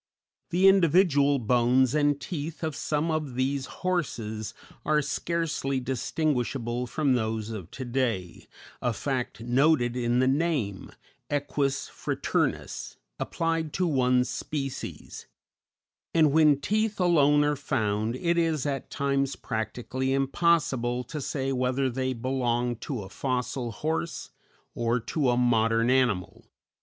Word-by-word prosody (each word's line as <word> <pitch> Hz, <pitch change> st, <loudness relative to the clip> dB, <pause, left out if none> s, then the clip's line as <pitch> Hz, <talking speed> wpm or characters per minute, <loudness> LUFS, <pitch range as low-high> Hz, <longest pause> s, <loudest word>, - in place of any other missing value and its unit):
The 185 Hz, +2 st, +4 dB
individual 165 Hz, -6 st, +5 dB
bones 125 Hz, +2 st, +3 dB
and 145 Hz, -1 st, +2 dB
teeth 155 Hz, +3 st, -5 dB
of 155 Hz, -2 st, -2 dB
some 155 Hz, +2 st, -1 dB
of 155 Hz, -5 st, -2 dB
these 130 Hz, +1 st, -1 dB, 0.2 s
horses 115 Hz, -, -2 dB, 0.3 s
are 155 Hz, 0 st, +3 dB
scarcely 150 Hz, -2 st, -1 dB
distinguishable 125 Hz, -2 st, -1 dB
from 145 Hz, 0 st, +1 dB
those 110 Hz, -2 st, -1 dB
of 95 Hz, -6 st, -7 dB
to 130 Hz, -, -7 dB
day, 120 Hz, -8 st, -2 dB, 0.3 s
a 125 Hz, -, 0 dB
fact 125 Hz, 0 st, -3 dB
noted 125 Hz, 0 st, +2 dB
in 120 Hz, -1 st, +1 dB
the 130 Hz, +1 st, +3 dB
name, 135 Hz, -, 0 dB, 0.4 s
Equus 140 Hz, -1 st, -1 dB
fraternus, -, -, -2 dB, 0.2 s
applied 165 Hz, -2 st, -1 dB
to 185 Hz, -, +1 dB
one 125 Hz, -5 st, +3 dB
species; 135 Hz, +1 st, -5 dB, 0.9 s
and 155 Hz, -3 st, +5 dB
when 150 Hz, -2 st, +5 dB
teeth 215 Hz, +6 st, 0 dB
alone 150 Hz, -5 st, +4 dB
are 150 Hz, 0 st, +1 dB
found, 110 Hz, -4 st, -1 dB
it 170 Hz, +5 st, +1 dB
is 160 Hz, -4 st, 0 dB
at 140 Hz, -2 st, -3 dB
times 140 Hz, -1 st, 0 dB
practically 125 Hz, +3 st, -3 dB
impossible 135 Hz, -4 st, +1 dB
to 150 Hz, +4 st, -6 dB
say 135 Hz, 0 st, -2 dB
whether 130 Hz, +1 st, 0 dB
they 130 Hz, +1 st, -1 dB
belong 120 Hz, -1 st, -1 dB
to 115 Hz, -1 st, -5 dB
a -, -, -9 dB
fossil 125 Hz, 0 st, -2 dB
horse 160 Hz, +8 st, -3 dB, 0.4 s
or 120 Hz, +1 st, 0 dB
to 135 Hz, +3 st, 0 dB
a 120 Hz, -, +2 dB
modern 115 Hz, -1 st, +3 dB
animal. 125 Hz, -9 st, 0 dB
135 Hz, 125 wpm, -27 LUFS, 120-150 Hz, 0.9 s, individual